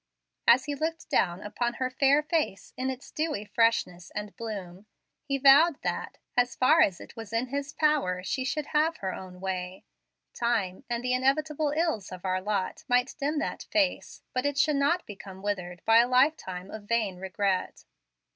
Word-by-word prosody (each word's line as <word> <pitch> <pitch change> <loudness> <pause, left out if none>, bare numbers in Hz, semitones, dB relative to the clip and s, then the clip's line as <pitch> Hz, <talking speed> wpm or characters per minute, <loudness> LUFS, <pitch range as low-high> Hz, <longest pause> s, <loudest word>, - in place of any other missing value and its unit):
As 250 +2 +6
he 290 - -2
looked 325 +3 -4
down 175 -1 +2
upon 240 +3 -2
her 255 +1 -2
fair 280 +3 +3
face 300 - -2
in 260 +1 -2
its 260 0 -7
dewy 305 -9 -2
freshness 205 -6 +1
and 210 0 -5
bloom, 205 -4 -7 0.4
he 275 -2 0
vowed 280 +4 +6
that, - - -3 0.2
as 245 0 +2
far 305 +6 +5
as 185 - +3
it - - -12
was 225 -3 -8
in 230 +2 -1
his 280 +1 -3
power, 280 -13 +1
she 260 +7 -2
should 295 +3 -2
have 315 +2 +2
her 190 -1 -3
own 185 -1 -9
way. 185 -1 -4 0.5
Time 225 -4 -1
and 235 0 -2
the 250 0 +1
inevitable 295 +4 +1
ills 315 - 0
of 185 0 -8
our 185 0 0
lot 200 -1 -2
might 245 -1 +2
dim 295 +2 -1
that - - -3
face, 295 -4 0
but 255 - 0
it 285 -1 -1
should 300 -1 +3
not 290 +6 +1
become 195 -2 -10
withered 180 -4 -3
by 225 0 +6
a 240 - +5
lifetime 250 - +1
of 215 -1 -8
vain 215 -4 0
regret. 190 0 -2
240 Hz, 180 wpm, -28 LUFS, 195-285 Hz, 0.5 s, As